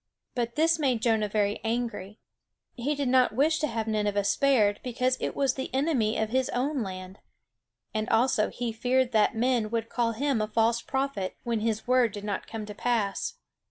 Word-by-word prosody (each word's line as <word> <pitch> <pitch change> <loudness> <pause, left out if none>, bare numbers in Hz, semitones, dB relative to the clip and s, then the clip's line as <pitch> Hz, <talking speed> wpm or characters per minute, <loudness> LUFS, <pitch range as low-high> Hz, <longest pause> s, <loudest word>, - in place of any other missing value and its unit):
But 235 -1 -2
this 325 +1 +3
made 260 -6 +1
Jonah 220 -3 +2
very 205 0 0
angry. 225 -3 -3 0.6
He 275 +4 -2
did 285 -2 -1
not 255 -3 +3
wish 310 +5 +3
to 305 - 0
have 225 -4 -2
Nineveh 210 -2 0
spared, 210 -2 +3
because 255 +1 0
it - - -3
was 275 -2 +2
the 265 - -5
enemy 265 -6 +1
of 220 - 0
his 260 +2 +1
own 270 +2 -1
land; 185 -1 -7 0.7
and 215 +1 -2
also 225 -1 +3
he 240 -1 -3
feared 250 +3 +1
that 220 0 +3
men 235 -2 +1
would 230 0 -2
call 235 -2 0
him 270 -1 0
a 215 - -1
false 230 +2 +2
prophet 265 -8 -2
when 235 -2 -1
his 220 0 -1
word 250 -4 +3
did 205 - -7
not 205 -1 -3
come 220 -2 -5
to 210 - -7
pass. 220 - -1
230 Hz, 190 wpm, -27 LUFS, 215-260 Hz, 0.7 s, this